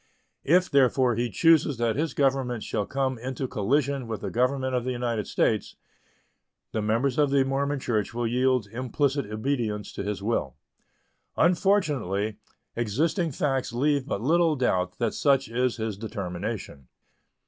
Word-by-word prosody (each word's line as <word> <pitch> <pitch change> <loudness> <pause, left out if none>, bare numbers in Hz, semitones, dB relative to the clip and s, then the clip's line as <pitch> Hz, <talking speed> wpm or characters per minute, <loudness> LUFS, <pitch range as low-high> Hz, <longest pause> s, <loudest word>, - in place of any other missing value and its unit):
If, 180 +5 +4
therefore, 130 -2 +3
he 120 +2 -1
chooses 160 -4 +3
that 115 -1 0
his 155 +2 -2
government 135 -4 +1
shall 105 -2 -2
come 130 -2 -1
into 130 +2 -4
collision 135 +4 0
with 110 -3 -4
the - - -4
Government 130 +2 0
of 125 -1 0
the 130 - -3
United 120 -4 -2
States, - - 0 1.0
the 110 - -1
members 115 +6 0
of 145 -1 +4
the 140 -1 +3
Mormon 140 +1 -1
Church 110 -5 -1
will 120 0 -2
yield 125 0 +2
implicit 130 +2 -1
obedience 110 -2 -2
to - - -5
his 100 0 -4
will. 100 - -1 0.8
Unfortunately, 145 - +1 0.4
existing 155 - 0
facts 135 -3 -1
leave 140 +2 +1
but 100 - -2
little 165 +2 +3
doubt 95 -9 0
that 115 -2 0
such 135 -2 +2
is 125 +1 0
his 110 -3 -4
determination. 100 - -5
125 Hz, 150 wpm, -26 LUFS, 110-140 Hz, 1.0 s, If